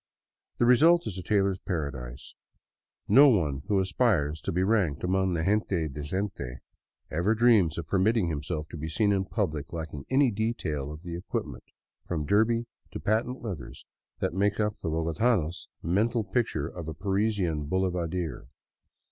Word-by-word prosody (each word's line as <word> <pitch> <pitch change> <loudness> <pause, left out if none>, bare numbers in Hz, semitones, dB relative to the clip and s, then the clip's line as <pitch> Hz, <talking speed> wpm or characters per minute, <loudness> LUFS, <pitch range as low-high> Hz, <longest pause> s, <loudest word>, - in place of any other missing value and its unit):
The 120 - +3
result 160 +8 +5
is 95 -3 -4
a - - -4
tailor's 95 0 +1
paradise. 70 -8 -5 0.7
No 145 +2 +8
one 75 - +1
who 100 -2 +2
aspires 90 - +1
to - - -3
be 90 +2 +1
ranked 95 -9 +1
among 95 0 +1
the 80 - -1
gente 95 -4 +1
decente 75 -2 -4 0.5
ever 90 +8 +1
dreams 110 -9 +4
of 85 - -4
permitting 100 +4 +2
himself 75 0 -3
to 85 - -7
be 80 +1 -4
seen 100 +6 +2
in 95 -1 +1
public 80 -10 -2
lacking 80 -4 -6
any 135 -1 +4
detail 100 - -2
of 75 +2 -10
the 85 -2 -5
equipment, 85 - -5 0.4
from 80 -4 -2
derby 110 +5 +2 0.3
to - - -4
patent 115 +4 -1
leathers, 90 - -7 0.4
that - - 0
makes 100 +2 +1
up 105 -1 0
the - - -3
bogotano's 80 +2 0 0.2
mental 110 +7 +1
picture 105 - -1
of 85 -1 -8
a 80 - -5
Parisian 95 -5 0
boulevardier. 90 -3 -2
95 Hz, 155 wpm, -28 LUFS, 80-105 Hz, 0.7 s, No